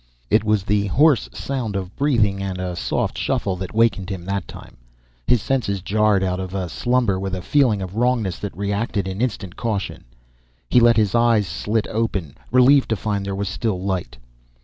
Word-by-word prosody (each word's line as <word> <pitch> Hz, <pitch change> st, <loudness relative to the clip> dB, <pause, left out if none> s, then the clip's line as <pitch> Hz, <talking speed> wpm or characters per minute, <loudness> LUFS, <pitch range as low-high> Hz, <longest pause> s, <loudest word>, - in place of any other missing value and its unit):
It 110 Hz, -, +4 dB
was 105 Hz, -2 st, +1 dB
the 100 Hz, 0 st, +1 dB
hoarse 145 Hz, +5 st, +3 dB
sound 125 Hz, -7 st, -4 dB
of 95 Hz, -1 st, -4 dB
breathing 115 Hz, -9 st, +1 dB
and 95 Hz, -1 st, -3 dB
a 90 Hz, -1 st, -3 dB
soft -, -, -2 dB
shuffle 95 Hz, -2 st, -1 dB
that 95 Hz, +2 st, -6 dB
wakened 110 Hz, -4 st, +2 dB
him 95 Hz, -3 st, -5 dB
that 100 Hz, -2 st, -3 dB
time. -, -, -12 dB, 0.5 s
His 120 Hz, -5 st, +3 dB
senses 100 Hz, -8 st, -1 dB
jarred 105 Hz, -1 st, +2 dB
out 90 Hz, -1 st, -1 dB
of 95 Hz, -2 st, -4 dB
slumber 120 Hz, -6 st, +1 dB
with 95 Hz, 0 st, -3 dB
a 90 Hz, -, -5 dB
feeling 120 Hz, -9 st, +2 dB
of 95 Hz, +1 st, -7 dB
wrongness 115 Hz, -5 st, 0 dB
that 100 Hz, -4 st, -6 dB
reacted 100 Hz, 0 st, -1 dB
in 95 Hz, +3 st, -4 dB
instant 100 Hz, -7 st, -3 dB
caution. 110 Hz, -4 st, -3 dB, 0.7 s
He 125 Hz, -, +6 dB
let 120 Hz, -1 st, +5 dB
his 105 Hz, -3 st, +2 dB
eyes 115 Hz, -3 st, +3 dB
slit 105 Hz, +6 st, -1 dB
open, 100 Hz, -10 st, -2 dB, 0.2 s
relieved 130 Hz, +2 st, +5 dB
to 110 Hz, -, +2 dB
find 100 Hz, 0 st, -2 dB
there 100 Hz, 0 st, -3 dB
was 100 Hz, 0 st, -2 dB
still 95 Hz, 0 st, -2 dB
light. 95 Hz, -6 st, -3 dB
100 Hz, 185 wpm, -21 LUFS, 95-115 Hz, 0.7 s, He